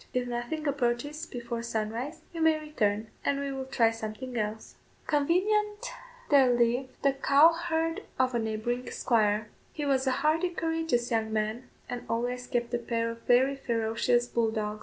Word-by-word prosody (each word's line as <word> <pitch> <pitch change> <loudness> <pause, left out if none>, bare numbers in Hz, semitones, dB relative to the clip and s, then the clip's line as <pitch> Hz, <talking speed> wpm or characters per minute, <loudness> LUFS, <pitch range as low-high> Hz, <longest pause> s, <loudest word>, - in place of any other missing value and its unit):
If 250 -1 0
nothing 245 +6 -3
approaches 280 +2 -1
before 235 -1 -5
sunrise, 235 +6 -3
you 330 - -4
may 320 -1 +4
return, 220 -8 -1
and 280 0 +1
we 280 0 -2
will 265 -1 -4
try 230 -3 +3
something 225 +3 -6
else." 215 -1 -3 0.3
Convenient 415 +8 +1 0.4
there 270 -3 +6
lived 245 +2 +1
the 275 -1 +4
cow 280 +4 +6
herd 330 -1 -1 0.2
of 255 -1 +2
a 235 - +1
neighbouring 225 +3 -2
squire. 215 -2 +1 0.2
He 295 - -3
was 270 -1 +1
a - - +4
hardy, 325 +4 +3
courageous 325 -8 -1
young 220 -1 0
man, 220 +3 -2 0.2
and 245 -1 -4
always 245 +2 -2
kept 240 -1 -1
a 240 - +1
pair 230 0 -1
of 230 0 -10
very 260 +3 +4
ferocious 235 -1 +1
bull 235 -2 +1
dogs. 215 -1 -3
245 Hz, 165 wpm, -29 LUFS, 230-290 Hz, 0.4 s, there